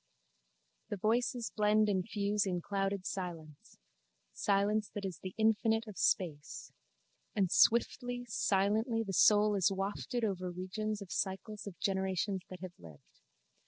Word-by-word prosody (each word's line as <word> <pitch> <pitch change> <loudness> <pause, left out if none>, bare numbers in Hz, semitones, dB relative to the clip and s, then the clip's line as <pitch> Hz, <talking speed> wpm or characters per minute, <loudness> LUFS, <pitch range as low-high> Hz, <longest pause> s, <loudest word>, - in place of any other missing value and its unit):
The 205 - -3
voices 235 +3 0
blend 215 0 +3
and 190 -3 +1
fuse 205 -1 0
in 180 -2 -1
clouded 195 +1 -2
silence: 165 -6 -6 0.6
silence 205 +1 +1
that 205 -1 -3
is 185 -4 -5
the 185 -1 -7
infinite 225 +1 +2
of 210 -4 -9
space: 150 -6 -1 0.6
and 190 -4 +1
swiftly, 245 +1 +3
silently 215 +2 +1
the 195 -3 -5
soul 210 +3 +5
is 195 -2 +3
wafted 200 +5 -3
over 185 -3 -2
regions 205 +4 -4
of 185 - -14
cycles 205 +2 -3
of 190 - -9
generations 190 0 -1
that 185 -1 -9
have 185 -2 -7
lived. 80 -4 -16
200 Hz, 135 wpm, -33 LUFS, 185-215 Hz, 0.6 s, soul